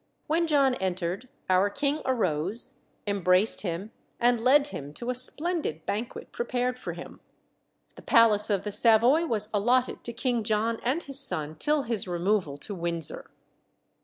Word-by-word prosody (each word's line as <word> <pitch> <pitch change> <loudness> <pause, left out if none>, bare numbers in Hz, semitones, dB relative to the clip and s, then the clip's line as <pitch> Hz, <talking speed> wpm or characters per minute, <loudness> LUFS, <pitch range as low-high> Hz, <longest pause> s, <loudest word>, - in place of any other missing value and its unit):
When 335 +2 0
John 280 -4 +3
entered, 185 +2 -3 0.2
our 185 +2 +3
king 285 +7 -1
arose, 195 - -2 0.3
embraced 195 0 +3
him, 190 +3 -5 0.3
and 240 -1 +2
led 280 +3 +4
him 145 - -8
to 245 +1 -3
a - - -2
splendid 280 - -2
banquet 220 +4 -5
prepared 250 +1 -2
for - - -6
him. - - -11 0.8
The - - -11
palace 220 -2 +4
of 200 -3 0
the 210 - -4
Savoy 240 +10 +3
was 215 -4 +4
allotted 245 +5 +1
to 235 - -3
King 240 -2 -2
John 225 +1 0
and 275 +8 -1
his 275 -1 +2
son, 155 - +3
till 295 - 0
his 225 -6 -2
removal 175 -4 -1
to 200 - -7
Windsor. 170 -3 -4
225 Hz, 155 wpm, -27 LUFS, 190-255 Hz, 0.8 s, led